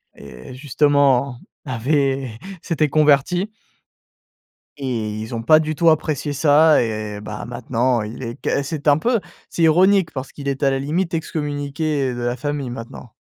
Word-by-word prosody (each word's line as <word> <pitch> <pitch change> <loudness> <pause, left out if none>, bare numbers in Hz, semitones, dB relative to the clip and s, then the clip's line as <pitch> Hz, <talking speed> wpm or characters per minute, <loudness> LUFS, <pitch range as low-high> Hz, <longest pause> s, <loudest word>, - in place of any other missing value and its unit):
et 65 - -11
justement, 140 -2 +2 0.3
avait 135 -1 -1 0.2
s'était 155 -3 0
converti 155 +6 +2 1.3
et 125 -6 -3
ils 110 +2 -5
ont 115 - -4
pas 155 +6 +6
du 155 0 -2
tout 170 +2 +4
apprécié 155 -2 0
ça 150 +2 +5
et, 110 -2 -4
bah, 105 0 -7
maintenant 120 0 -1
il 110 +5 -7
est 115 -1 -5
qu'est 140 - 0
c'est 150 +1 -5
un 145 -1 +6
peu 230 +8 +1 0.3
c'est - - -4
ironique 180 +3 +4
parce 135 0 -6
qu'il 140 -1 -8
est 140 +1 -2
à 135 - +4
la 135 - -1
limite 165 +6 -2
ex 165 -1 -3
communiqué, 145 -1 -2
heu, - - -5
de 120 - -5
la 120 0 -1
famille 140 -1 -4
maintenant. 120 -1 -9
140 Hz, 165 wpm, -20 LUFS, 120-155 Hz, 1.3 s, pas